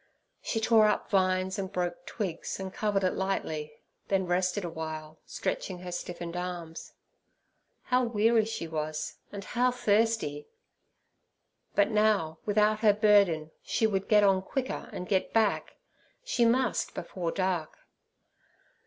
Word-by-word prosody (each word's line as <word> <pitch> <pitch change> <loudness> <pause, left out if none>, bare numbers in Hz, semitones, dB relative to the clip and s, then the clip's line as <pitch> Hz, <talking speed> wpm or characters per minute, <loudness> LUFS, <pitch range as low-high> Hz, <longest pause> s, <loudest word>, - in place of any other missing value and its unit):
She 225 - -2
tore 220 -1 +5
up - - -1
vines 185 -1 +1
and 190 -1 -4
broke 175 -1 -3
twigs, 190 -6 -4
and 190 -1 -5
covered 205 -2 0
it 185 - +2
lightly, 160 -6 -2 0.3
then 190 -1 +1
rested 180 +2 0
awhile, 160 -1 -6
stretching 185 - -3
her 180 -1 -6
stiffened 175 -1 -5
arms. 175 -2 -6 0.9
How 250 0 +2
weary 225 0 +3
she 215 -6 -4
was, 155 -1 -4
and 200 -1 -6
how 245 +5 +1
thirsty! 220 -10 +1 1.3
But 205 +2 +3
now, 210 -7 +2
without 210 +1 +3
her 215 -2 +5
burden, 200 -7 +3
she 225 - 0
would 195 -3 0
get 210 -1 +6
on 195 -2 +4
quicker 260 +6 -4
and 180 - -6
get 190 -2 0
back—she 235 - -1
must 245 +1 +1
before 175 -3 -3
dark. 185 -4 -1
190 Hz, 130 wpm, -29 LUFS, 175-215 Hz, 1.3 s, get